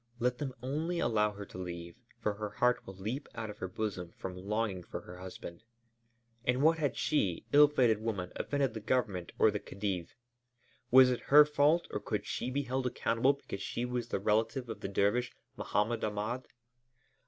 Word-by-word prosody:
Let 125 Hz, +1 st, 0 dB
them 135 Hz, -3 st, -4 dB
only 155 Hz, +7 st, -1 dB
allow 105 Hz, -8 st, +2 dB
her 100 Hz, 0 st, -7 dB
to 95 Hz, -, -10 dB
leave, 85 Hz, +3 st, -6 dB, 0.2 s
for 105 Hz, -3 st, 0 dB
her 105 Hz, 0 st, -4 dB
heart 125 Hz, +3 st, +1 dB
will 95 Hz, -, -8 dB
leap 110 Hz, +9 st, -4 dB
out 110 Hz, -2 st, -4 dB
of 105 Hz, -, -14 dB
her 95 Hz, -, -3 dB
bosom 90 Hz, -3 st, -4 dB
from 90 Hz, -1 st, -5 dB
longing 100 Hz, 0 st, -2 dB
for -, -, -7 dB
her 90 Hz, 0 st, -11 dB
husband. 90 Hz, -2 st, -8 dB, 0.8 s
In 125 Hz, +1 st, +1 dB
what 160 Hz, +2 st, +4 dB
had 145 Hz, -3 st, 0 dB
she, 100 Hz, -, 0 dB
ill 145 Hz, +1 st, +9 dB
fated 120 Hz, -7 st, +2 dB
woman, 100 Hz, -6 st, -3 dB
offended 140 Hz, -4 st, 0 dB
the 110 Hz, -, -4 dB
Government 100 Hz, -6 st, -1 dB
or 110 Hz, -, +5 dB
the 105 Hz, -, -2 dB
Khedive? 95 Hz, -4 st, -4 dB, 0.7 s
Was 130 Hz, 0 st, +8 dB
it 125 Hz, -, -1 dB
her 150 Hz, +1 st, +9 dB
fault 150 Hz, +3 st, +3 dB
or -, -, -2 dB
could -, -, -3 dB
she -, -, -3 dB
be 140 Hz, +2 st, -1 dB
held 130 Hz, 0 st, -1 dB
accountable 120 Hz, +2 st, +2 dB
because 140 Hz, -8 st, -7 dB
she 120 Hz, -, -2 dB
was 125 Hz, -1 st, -2 dB
the -, -, -1 dB
relative 110 Hz, +4 st, +1 dB
of 110 Hz, -2 st, -5 dB
the 100 Hz, -, -4 dB
dervish, 105 Hz, +5 st, +1 dB, 0.2 s
Mohammed 110 Hz, +3 st, 0 dB
Ahmed? 110 Hz, +4 st, -2 dB
115 Hz, 190 wpm, -32 LUFS, 100-130 Hz, 0.8 s, ill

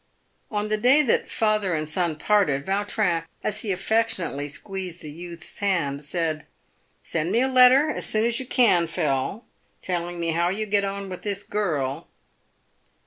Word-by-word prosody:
On 210 Hz, 0 st, -2 dB
the 215 Hz, -, +1 dB
day 260 Hz, +7 st, +5 dB
that 250 Hz, -, +1 dB
father 215 Hz, -5 st, +1 dB
and 155 Hz, 0 st, -2 dB
son 165 Hz, 0 st, 0 dB
parted, 150 Hz, -5 st, +1 dB
Yautrin, 195 Hz, -3 st, 0 dB, 0.2 s
as 215 Hz, 0 st, -1 dB
he 215 Hz, -2 st, -3 dB
affectionately 195 Hz, -6 st, 0 dB
squeezed 180 Hz, +3 st, -5 dB
the 150 Hz, -, -7 dB
youth's 170 Hz, +2 st, -8 dB
hand, 165 Hz, -8 st, 0 dB
said, 155 Hz, 0 st, -2 dB, 0.3 s
" -, -, -41 dB
Send 165 Hz, +2 st, -2 dB
me 230 Hz, +4 st, +3 dB
a 260 Hz, -, +3 dB
letter 260 Hz, +3 st, +6 dB
as 305 Hz, -, -2 dB
soon 215 Hz, +1 st, +2 dB
as 235 Hz, +1 st, +1 dB
you 260 Hz, -, -6 dB
can, 195 Hz, -11 st, +4 dB
Phil, 160 Hz, -, -2 dB, 0.4 s
telling 175 Hz, -1 st, -3 dB
me 165 Hz, -1 st, -1 dB
how 170 Hz, +2 st, +1 dB
you 210 Hz, +4 st, -2 dB
get 205 Hz, -1 st, +1 dB
on 200 Hz, 0 st, -4 dB
with 185 Hz, -1 st, -7 dB
this 200 Hz, -1 st, -3 dB
girl." 160 Hz, -9 st, -2 dB
190 Hz, 170 wpm, -24 LUFS, 165-215 Hz, 0.4 s, letter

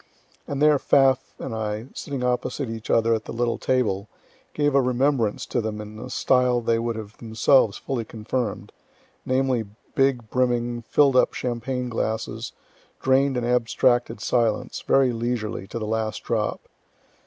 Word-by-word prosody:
And 140 Hz, +1 st, -1 dB
there 150 Hz, -2 st, +5 dB
Pfaff 135 Hz, -1 st, +3 dB
and 130 Hz, -, -5 dB
I, 110 Hz, 0 st, -3 dB
sitting 140 Hz, -3 st, -5 dB
opposite 125 Hz, +1 st, -1 dB
each 115 Hz, -1 st, -7 dB
other 115 Hz, 0 st, +3 dB
at 110 Hz, -1 st, -2 dB
the -, -, -7 dB
little 120 Hz, 0 st, -1 dB
table, 105 Hz, -6 st, 0 dB, 0.5 s
gave 145 Hz, -1 st, +2 dB
a 140 Hz, -, +5 dB
remembrance 125 Hz, -3 st, +1 dB
to -, -, -1 dB
them 110 Hz, -1 st, -4 dB
in 105 Hz, 0 st, -8 dB
a -, -, -7 dB
style 125 Hz, -1 st, +2 dB
they 115 Hz, -1 st, +1 dB
would 115 Hz, 0 st, -2 dB
have 110 Hz, -1 st, -8 dB
themselves 115 Hz, 0 st, +3 dB
fully 130 Hz, -4 st, -3 dB
confirm'd, 110 Hz, 0 st, -4 dB, 0.6 s
namely, 130 Hz, -2 st, +1 dB, 0.3 s
big, 135 Hz, -4 st, +1 dB
brimming, 120 Hz, -1 st, 0 dB
fill'd 135 Hz, +3 st, +3 dB
up 125 Hz, -, +3 dB
champagne 125 Hz, +1 st, -2 dB
glasses, 110 Hz, -1 st, -3 dB, 0.5 s
drain'd 135 Hz, 0 st, +2 dB
in 120 Hz, -, -1 dB
abstracted 120 Hz, 0 st, +1 dB
silence, 120 Hz, 0 st, 0 dB
very 135 Hz, -2 st, +3 dB
leisurely, 115 Hz, -4 st, -3 dB
to 115 Hz, -, -6 dB
the 110 Hz, -, -3 dB
last 110 Hz, 0 st, -2 dB
drop. -, -, -1 dB
120 Hz, 155 wpm, -24 LUFS, 110-130 Hz, 0.6 s, there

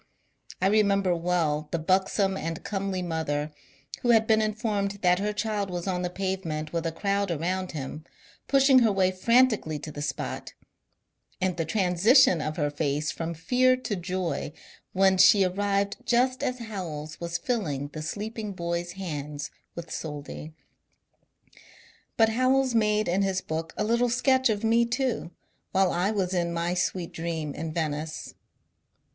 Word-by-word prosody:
I 185 Hz, -, 0 dB
remember 200 Hz, -3 st, +3 dB
well 165 Hz, -3 st, 0 dB
the 170 Hz, -, -1 dB
buxom 190 Hz, +3 st, +1 dB
and 165 Hz, -2 st, -4 dB
comely 195 Hz, -2 st, -2 dB
mother, 155 Hz, -3 st, -2 dB, 0.5 s
who 240 Hz, -, 0 dB
had 225 Hz, -2 st, +5 dB
been 220 Hz, 0 st, +3 dB
informed 215 Hz, -2 st, -1 dB
that 180 Hz, 0 st, +4 dB
her 210 Hz, +1 st, 0 dB
child 210 Hz, -2 st, -2 dB
was 175 Hz, -1 st, -4 dB
on 185 Hz, -2 st, -1 dB
the 180 Hz, -, -1 dB
pavement 180 Hz, -5 st, -3 dB
with 165 Hz, 0 st, -1 dB
a -, -, -1 dB
crowd 200 Hz, +3 st, -1 dB
around 180 Hz, +3 st, -2 dB
him, 150 Hz, +1 st, -6 dB, 0.4 s
pushing 270 Hz, -1 st, +6 dB
her 230 Hz, -3 st, +4 dB
way 190 Hz, -1 st, +2 dB
frantically 220 Hz, -5 st, +3 dB
to 155 Hz, -, -7 dB
the 145 Hz, -, -7 dB
spot, 145 Hz, -2 st, -4 dB, 0.9 s
and 185 Hz, -1 st, 0 dB
the 165 Hz, -2 st, -2 dB
transition 185 Hz, -, +4 dB
of 155 Hz, +1 st, -3 dB
her 145 Hz, -2 st, 0 dB
face 150 Hz, 0 st, -1 dB
from 165 Hz, 0 st, -4 dB
fear 255 Hz, +10 st, +3 dB
to 240 Hz, -5 st, -3 dB
joy 175 Hz, -5 st, -3 dB, 0.4 s
when 190 Hz, 0 st, +4 dB
she 195 Hz, +1 st, +7 dB
arrived 200 Hz, +2 st, 0 dB
just 255 Hz, +2 st, +2 dB
as 250 Hz, -, -1 dB
Howells 170 Hz, -10 st, -6 dB
was 170 Hz, 0 st, -2 dB
filling 160 Hz, -, -2 dB
the 155 Hz, +1 st, -7 dB
sleeping 210 Hz, +5 st, -4 dB
boy's 170 Hz, -1 st, -3 dB
hands 150 Hz, -6 st, -5 dB, 0.2 s
with 170 Hz, 0 st, -7 dB
soldi. 150 Hz, 0 st, -6 dB, 1.7 s
But 225 Hz, -1 st, +5 dB
Howells 255 Hz, +2 st, +2 dB
made 215 Hz, -1 st, +2 dB
in 185 Hz, +3 st, +1 dB
his 195 Hz, -1 st, +1 dB
book 165 Hz, -2 st, -4 dB
a -, -, 0 dB
little 235 Hz, +3 st, +2 dB
sketch 260 Hz, +1 st, +3 dB
of 210 Hz, 0 st, -1 dB
me, 230 Hz, +1 st, +4 dB
too, 235 Hz, -5 st, -1 dB, 0.4 s
while 190 Hz, -1 st, +3 dB
I 180 Hz, +3 st, +1 dB
was 190 Hz, -4 st, -1 dB
in 170 Hz, -2 st, 0 dB
my 170 Hz, +1 st, -1 dB
sweet 180 Hz, -1 st, -1 dB
dream 160 Hz, -3 st, -3 dB
in 160 Hz, +2 st, -5 dB
Venice. 155 Hz, -1 st, -3 dB
185 Hz, 155 wpm, -27 LUFS, 165-215 Hz, 1.7 s, she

